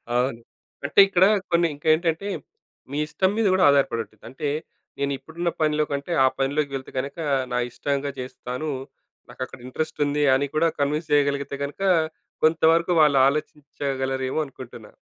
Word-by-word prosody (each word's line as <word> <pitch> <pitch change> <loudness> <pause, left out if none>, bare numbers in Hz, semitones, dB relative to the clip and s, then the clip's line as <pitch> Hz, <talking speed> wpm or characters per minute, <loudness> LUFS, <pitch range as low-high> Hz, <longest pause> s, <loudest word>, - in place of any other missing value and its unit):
అవును. 125 -1 0 0.4
అంటే 145 - +2
ఇక్కడ 185 -1 +4 0.3
కొన్ని 170 0 +4
ఇంకేంటంటే 160 +5 +1 0.6
మీ 145 - -3
ఇష్టం 185 +5 +1
మీద 225 - +2
కూడా 185 -1 +3
ఆధారపడి 135 -4 +2
ఉంటుంది. 105 0 -25
అంటే 140 +3 -3 0.5
నేనిప్పుడున్న 160 +5 -2
పనిలో 155 0 +2
కంటే 140 +4 -3
ఆ - - +6
పనిలోకి 140 +1 0
వెళ్తే 130 -1 -7
గనక, 140 +6 -5 0.4
నా 125 - +1
ఇష్టంగా 140 +1 -2
చేస్తాను. 125 +3 -5 0.6
నాకక్కడ 130 +1 -7
ఇంట్రెస్ట్ 155 +5 -4
ఉంది 145 +1 0
అని 140 +1 0
కూడా 165 +2 +3
కన్విన్స్ 150 +3 -1
చేయగలిగితే 140 -1 +1
గనక, 145 +7 -6 0.6
కొంతవరకు 165 +2 +3
వాళ్ళు 145 -3 +5
ఆలోచించగలరేమో 135 -2 -2
అనుకుంటున్నా. 120 -5 -11
145 Hz, 135 wpm, -24 LUFS, 135-155 Hz, 0.6 s, ఆ